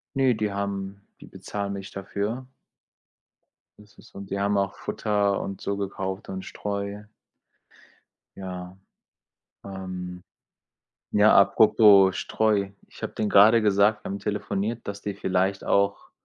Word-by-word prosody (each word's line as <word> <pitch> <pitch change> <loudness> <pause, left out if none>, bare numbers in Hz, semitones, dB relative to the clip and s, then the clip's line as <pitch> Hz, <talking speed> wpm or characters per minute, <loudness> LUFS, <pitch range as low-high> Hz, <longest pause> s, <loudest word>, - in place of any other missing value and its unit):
Ne, 130 -3 +3
die 105 -2 -2
haben 100 0 -4 0.2
die - - -12
bezahlen 100 -1 -5
mich 100 0 -7
dafür. 105 +6 -4 1.3
Das 105 0 -19
ist 110 - -18
und 100 -1 -9
die 100 - -2
haben 100 0 +1
auch 100 -1 0
Futter 100 -2 -1
und 100 - -6
so 100 0 -2
gekauft 95 0 -4
und 95 -1 -5
Streu. 100 0 -5 1.3
Ja. 90 -1 -7 0.9
Ähm, 90 -2 -7 0.9
ja, 105 +1 +5
apropos 100 -2 +6
Streu, 105 -3 0 0.2
ich - - -16
habe - - -4
denen 105 - -2
gerade 110 +4 +6
gesagt, 105 +1 +3
wir - - -5
haben 100 - -4
telefoniert, 105 +2 -3
dass 100 0 -6
die 100 - -3
vielleicht 95 +1 -1
auch: 100 0 0
100 Hz, 135 wpm, -25 LUFS, 95-105 Hz, 1.3 s, apropos